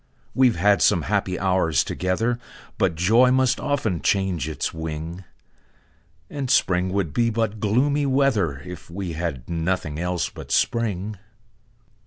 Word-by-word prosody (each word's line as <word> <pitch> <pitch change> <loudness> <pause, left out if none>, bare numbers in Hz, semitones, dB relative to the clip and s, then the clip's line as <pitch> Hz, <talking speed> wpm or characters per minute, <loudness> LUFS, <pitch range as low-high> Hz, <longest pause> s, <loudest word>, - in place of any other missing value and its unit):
We've 130 -3 +4
had 100 +3 +3
some 85 - +3
happy 95 -1 -1
hours 90 -5 +2
together, 115 +7 -1 0.4
But 95 -5 +2
joy 110 +9 +4
must 130 -1 +2
often 110 - -1
change 95 -6 0
its 80 - -3
wing; 80 +3 -6 1.0
And 135 - -4
spring 95 -8 +2
would 95 -6 -1
be 115 +5 +2
but 110 -1 -1
gloomy 140 +8 +1
weather, 115 - +1
If 90 -2 -9
we 90 -1 -5
had 80 -7 -4
nothing 80 -2 -2
else 90 0 -1
but - - -10
spring. 105 -3 0
95 Hz, 135 wpm, -23 LUFS, 85-115 Hz, 1.0 s, We've